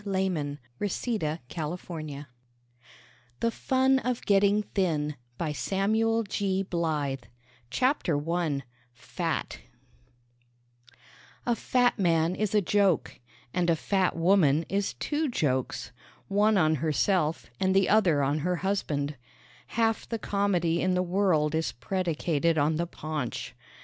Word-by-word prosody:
Facing 185 Hz, -8 st, -1 dB, 0.2 s
the 205 Hz, -, 0 dB
Tissue 225 Hz, +3 st, -2 dB
THE 155 Hz, 0 st, -2 dB, 2.1 s
FUN 265 Hz, +2 st, +2 dB
OF 250 Hz, -2 st, -3 dB
GETTING 205 Hz, +1 st, +3 dB
THIN 155 Hz, -6 st, 0 dB, 2.5 s
CHAPTER 190 Hz, -, +1 dB
I 165 Hz, -5 st, 0 dB, 0.3 s
FAT 125 Hz, -, -3 dB, 1.9 s
A 240 Hz, -, +2 dB
fat 245 Hz, 0 st, +2 dB
man 165 Hz, -2 st, +2 dB
is 215 Hz, +1 st, -1 dB
a 210 Hz, -, +5 dB
joke; 195 Hz, -3 st, +1 dB, 0.3 s
and 175 Hz, -1 st, +1 dB
a 165 Hz, -, +4 dB
fat 190 Hz, +3 st, 0 dB
woman 165 Hz, -3 st, +3 dB
is 200 Hz, 0 st, -1 dB
two 300 Hz, 0 st, -1 dB
jokes 130 Hz, -, -1 dB, 0.4 s
one 205 Hz, +1 st, +3 dB
on 160 Hz, -3 st, +4 dB
herself 155 Hz, +1 st, 0 dB
and 190 Hz, 0 st, +2 dB
the 195 Hz, -1 st, +4 dB
other 180 Hz, -10 st, +4 dB
on 145 Hz, +3 st, +1 dB
her 180 Hz, +4 st, 0 dB
husband. 155 Hz, -6 st, -1 dB, 0.5 s
Half 225 Hz, -1 st, 0 dB
the 230 Hz, -, -1 dB
comedy 185 Hz, -6 st, 0 dB
in 185 Hz, 0 st, +1 dB
the 180 Hz, -, +2 dB
world 175 Hz, -5 st, +2 dB
is 160 Hz, 0 st, -1 dB
predicated 165 Hz, +2 st, 0 dB
on 155 Hz, +1 st, +2 dB
the 170 Hz, +1 st, -1 dB
paunch. 155 Hz, -7 st, -4 dB
180 Hz, 110 wpm, -28 LUFS, 155-205 Hz, 2.5 s, a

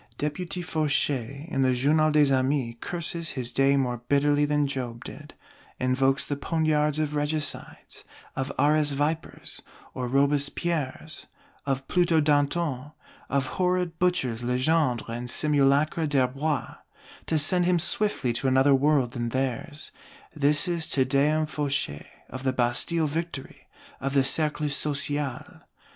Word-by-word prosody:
Deputy 175 Hz, +5 st, -3 dB
Fauchet, 145 Hz, -3 st, -1 dB
in 135 Hz, -, 0 dB
the 130 Hz, -1 st, +2 dB
Journal 155 Hz, +5 st, +3 dB
des 150 Hz, -2 st, +4 dB
Amis, 130 Hz, -2 st, 0 dB
curses 170 Hz, -1 st, -2 dB
his 125 Hz, -2 st, -3 dB
day 135 Hz, +2 st, +3 dB
more 125 Hz, -3 st, -1 dB
bitterly 145 Hz, +1 st, +3 dB
than 145 Hz, 0 st, +1 dB
Job 125 Hz, -4 st, -5 dB
did; 150 Hz, 0 st, -10 dB, 0.4 s
invokes 135 Hz, +2 st, +1 dB
the 145 Hz, -, -2 dB
poniards 150 Hz, 0 st, 0 dB
of 155 Hz, -1 st, -1 dB
Regicides, 150 Hz, 0 st, -3 dB, 0.3 s
of 135 Hz, +1 st, -3 dB
"Arras 150 Hz, 0 st, +3 dB
Vipers" 150 Hz, +3 st, -2 dB, 0.3 s
or 125 Hz, -1 st, -4 dB
Robespierres, 140 Hz, +2 st, -1 dB, 0.4 s
of 135 Hz, -1 st, -2 dB
Pluto 175 Hz, -2 st, +2 dB
Dantons, 145 Hz, -1 st, 0 dB, 0.4 s
of 140 Hz, -1 st, 0 dB
horrid 180 Hz, +1 st, -1 dB
Butchers 135 Hz, -11 st, 0 dB
Legendre 125 Hz, +1 st, +1 dB
and 120 Hz, +1 st, -5 dB
Simulacra 145 Hz, +3 st, +2 dB
d'Herbois, 140 Hz, 0 st, -1 dB, 0.5 s
to 160 Hz, -, +1 dB
send 175 Hz, +4 st, +3 dB
him 180 Hz, 0 st, +3 dB
swiftly 170 Hz, -, +1 dB
to 125 Hz, +3 st, -1 dB
another 135 Hz, +2 st, +4 dB
world 135 Hz, -2 st, +2 dB
than 120 Hz, -2 st, -3 dB
theirs. 135 Hz, +5 st, -3 dB, 0.4 s
This 145 Hz, +1 st, +2 dB
is 170 Hz, -2 st, 0 dB
Te 135 Hz, -, +2 dB
Deum 150 Hz, +4 st, +2 dB
Fauchet, 140 Hz, -, -2 dB, 0.2 s
of 130 Hz, -, -8 dB
the 130 Hz, -1 st, 0 dB
Bastille 130 Hz, +7 st, +2 dB
Victory, 155 Hz, -2 st, -5 dB, 0.3 s
of 135 Hz, +1 st, -3 dB
the 135 Hz, -, +4 dB
Cercle 150 Hz, +2 st, +1 dB
Social. 145 Hz, -1 st, -2 dB
145 Hz, 130 wpm, -26 LUFS, 130-155 Hz, 0.5 s, des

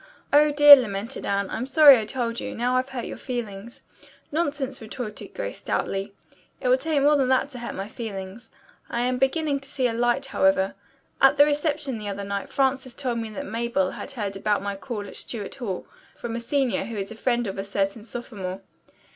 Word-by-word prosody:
"Oh, 300 Hz, +1 st, +6 dB
dear!" 290 Hz, 0 st, +11 dB
lamented 230 Hz, -1 st, -3 dB
Anne. 200 Hz, 0 st, 0 dB
"I'm 250 Hz, +3 st, -3 dB
sorry 280 Hz, -2 st, +8 dB
I 215 Hz, -, -3 dB
told 235 Hz, 0 st, -2 dB
you. -, -, -5 dB
Now 245 Hz, +2 st, 0 dB
I've 255 Hz, +1 st, +1 dB
hurt 250 Hz, -3 st, -4 dB
your -, -, -7 dB
feelings." 235 Hz, -3 st, -6 dB, 0.5 s
"Nonsense!" 285 Hz, -4 st, -2 dB
retorted 220 Hz, -1 st, -7 dB
Grace -, -, -4 dB
stoutly. 195 Hz, +1 st, -2 dB, 0.5 s
"It 255 Hz, -, -1 dB
will 255 Hz, -, +5 dB
take 300 Hz, 0 st, 0 dB
more 295 Hz, +1 st, +5 dB
than 270 Hz, -3 st, +2 dB
that 260 Hz, +2 st, +2 dB
to 250 Hz, -, -8 dB
hurt 235 Hz, -, -6 dB
my 195 Hz, +1 st, -4 dB
feelings. 215 Hz, 0 st, -7 dB, 0.4 s
I 235 Hz, -, -1 dB
am 250 Hz, +1 st, 0 dB
beginning 280 Hz, +2 st, +1 dB
to 275 Hz, 0 st, -15 dB
see 260 Hz, -, -1 dB
a 240 Hz, -, +1 dB
light, 240 Hz, +3 st, +1 dB
however. 190 Hz, -7 st, +2 dB, 0.5 s
At 270 Hz, +1 st, +6 dB
the 290 Hz, -, +8 dB
reception 295 Hz, -4 st, -1 dB
the 210 Hz, -1 st, -5 dB
other 200 Hz, 0 st, -4 dB
night 200 Hz, 0 st, -4 dB
Frances 265 Hz, -2 st, 0 dB
told 250 Hz, -4 st, -2 dB
me 225 Hz, -1 st, -4 dB
that 285 Hz, +7 st, -6 dB
Mabel 230 Hz, -6 st, -1 dB
had -, -, -7 dB
heard 205 Hz, -6 st, -4 dB
about 200 Hz, 0 st, 0 dB
my 200 Hz, 0 st, -3 dB
call 210 Hz, 0 st, -5 dB
at -, -, -10 dB
Stuart 210 Hz, -5 st, -5 dB
Hall 205 Hz, -9 st, -4 dB, 0.3 s
from 235 Hz, -1 st, -5 dB
a -, -, -2 dB
senior 245 Hz, -5 st, 0 dB
who 220 Hz, 0 st, -6 dB
is 195 Hz, 0 st, -4 dB
a -, -, -7 dB
friend 240 Hz, +1 st, 0 dB
of 195 Hz, -1 st, -4 dB
a -, -, -2 dB
certain 200 Hz, +2 st, -2 dB
sophomore. 200 Hz, -5 st, -6 dB
240 Hz, 205 wpm, -25 LUFS, 205-270 Hz, 0.5 s, dear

